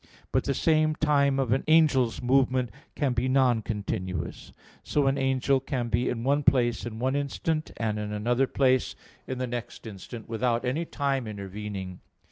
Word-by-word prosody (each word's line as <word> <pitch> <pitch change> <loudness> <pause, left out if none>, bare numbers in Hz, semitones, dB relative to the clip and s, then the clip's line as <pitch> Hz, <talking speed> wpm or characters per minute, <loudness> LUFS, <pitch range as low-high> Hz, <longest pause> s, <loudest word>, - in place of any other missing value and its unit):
But - - +1
the - - 0
same 155 -2 +2
time 140 -3 +2
of 130 -4 0
an 130 - +2
angel's 150 -8 +3
movement 130 -2 +2 0.2
can 140 -4 0
be 120 +1 0
non 130 -4 +3
continuous. 95 -5 -4 0.3
So 145 -2 0
an 135 0 +3
angel 135 0 +2
can 130 -3 -3
be 115 +3 +1
in 115 -1 -3
one 140 +3 +2
place 120 -4 +2
in 110 -2 -7
one 130 +3 0
instant, 155 +3 -2
and 110 -2 -1
in 105 0 -4
another 120 +5 +1
place 130 -2 +2 0.3
in 130 - -3
the 130 - -1
next 120 -1 -6
instant, 110 +2 -9
without 120 +1 0
any 145 +7 -1
time 135 -6 -1
intervening. 100 -2 -6
125 Hz, 170 wpm, -27 LUFS, 115-135 Hz, 0.3 s, angel's